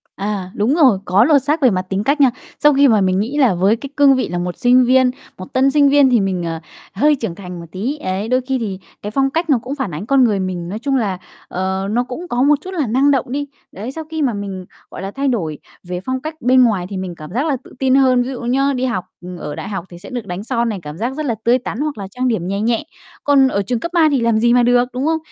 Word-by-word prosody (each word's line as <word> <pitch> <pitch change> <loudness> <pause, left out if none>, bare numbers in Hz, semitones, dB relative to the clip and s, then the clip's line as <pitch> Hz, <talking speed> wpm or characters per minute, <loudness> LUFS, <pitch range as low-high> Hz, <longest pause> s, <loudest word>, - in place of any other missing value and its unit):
À, 195 -2 -4
đúng 225 +8 +1
rồi, 265 - +5
có 190 +4 +4
lột 285 0 +4
xác 300 +3 0
về 260 - +6
mặt 185 -4 0
tính 195 +1 -1
cách 285 +5 +1
nha. 265 -3 +6 0.3
Sau 295 0 +5
khi 280 +1 +5
mà 220 -5 +4
mình 185 0 +1
nghĩ 240 +8 -2
là 260 -8 +4
với 195 +5 +3
cái 275 +4 -8
cương 280 -2 +6
vị 260 - -1
là 175 - -3
một 175 0 -3
sinh 250 +1 +4
viên, 255 0 +4 0.3
một 185 - -10
tân 265 +1 +3
sinh 285 -1 +4
viên 285 -1 +5
thì 245 -2 +4
mình, 190 -3 -1
ờ, 165 -1 -3 0.3
hơi 295 +9 +3
trưởng 225 -10 -4
thành 180 -2 -8
một 170 - -8
tí, 240 +11 -3
ấy, 190 -3 -3
đôi 255 +2 +2
khi 260 +1 -2
thì 200 -5 -4 0.2
cái 210 - -5
phong 270 +3 +1
cách 330 +4 -2
nó 280 - +5
cũng 270 +3 -4
phản 265 -9 -3
ánh 160 +7 -5
con 270 +2 +4
người 210 -5 +2
mình, 180 -2 -4
nói 210 - -4
chung 275 +2 -1
là, 205 -7 0 0.3
ờ, 190 +1 -2
nó 240 +3 +1
cũng 255 +8 -7
có 245 -6 -1
một 295 +2 +5
chút 375 - -8
là 310 -8 -1
năng 265 +6 +3
động 270 -4 +1
đi. 285 +2 -2 0.2
Đấy, 215 +7 -6
sau 320 +3 -6
khi 315 - -2
mà 260 -5 +1
mình, 195 -2 -6 0.3
gọi - - -8
là, 195 +1 -5
thay 275 +4 -2
đổi 165 - -2 0.2
về 180 0 -5
phong 260 0 -2
cách 310 +2 -5
bên 255 +1 +5
ngoài 205 -7 +1
thì 195 - -5
mình 185 -2 -5
cảm 155 0 -10
giác 260 +6 0
là 290 -4 0
tự - - -16
tin 265 -1 +3
hơn. 260 -2 +4
Ví 250 - -5
dụ 260 - -6
nhá, 270 +4 +1
đi 255 +1 -1
học 230 -8 -2 0.3
ở 150 -3 -6
đại - - -6
học 195 -4 -4
thì 175 - -11
sẽ 195 - -11
được 245 -3 -5
đánh 180 +2 -5
son 235 0 -1
này, 210 -3 -4
cảm 150 0 -8
giác 240 +6 -2
rất 305 +2 -4
là 235 -5 0
tươi 245 +2 +3
tắn, 245 -2 -6
hoặc 300 -2 -2
là 200 -2 -6
trang 250 +6 -2
điểm 220 -8 -1
nhè 200 +2 -2
nhẹ, 230 +2 0 0.4
còn 280 -2 +5
ở 200 -6 0
trường 225 +4 -2
cấp 340 - -5
3 330 -3 +5
thì 275 - +2
làm 230 -1 +2
gì 235 +2 +3
mà 245 0 +4
được, 245 +1 +3
đúng 255 +2 -2
không? 320 +1 +2
240 Hz, 295 wpm, -18 LUFS, 195-270 Hz, 0.4 s, về